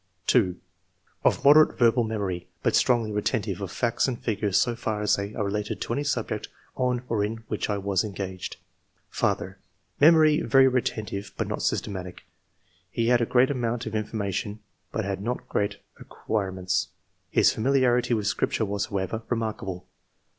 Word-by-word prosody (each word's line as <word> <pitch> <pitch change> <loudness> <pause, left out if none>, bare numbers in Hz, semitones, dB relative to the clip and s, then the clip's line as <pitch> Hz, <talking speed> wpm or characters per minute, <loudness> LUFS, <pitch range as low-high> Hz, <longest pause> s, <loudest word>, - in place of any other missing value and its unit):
2. 95 -7 +3 0.4
" 90 -1 -40
Of - - +2
moderate 150 +2 +7
verbal 120 0 +4
memory, 100 -5 -3 0.2
but - - +2
strongly 115 -4 +3
retentive 105 0 -1
of - - -4
facts - - 0
and 125 -3 -3
figures 105 -3 0
so 120 +3 +2
far 110 -2 -3
as 105 - +3
they 100 +2 -5
are 105 - -1
related 105 +1 -2
to - - -2
any 140 - -1
subject 140 - -2 0.3
on 125 -1 0
or 110 -4 0
in 110 +2 -4
which 105 - -2
I 105 - 0
was 100 -1 0
engaged. 95 -3 -5 0.5
^^ - - -18
Father - - -1 0.2
— - - -44
Memory 155 -1 +6
very 135 -1 +5
retentive, 105 -5 -2
but - - 0
not - - -3
systematic. 90 -3 -3 0.7
He 115 +4 0
had 120 -1 +4
a 115 - +1
great 130 +1 +4
amoimt 120 -3 -1
of 110 - -5
in 110 -1 -1
formation, 105 0 -3 0.3
but 110 - -2
had 100 -1 -3
not 120 +4 -3
great 100 0 -1 0.2
acquirements; 95 -4 -2 0.4
his - - +4
familiarity 125 -1 +2
with 105 -2 -2
Scripture 110 +1 0
was, 100 0 -2
however, 100 +1 -3
re 120 - +1
markable. 95 -5 -4
110 Hz, 175 wpm, -26 LUFS, 100-120 Hz, 0.7 s, moderate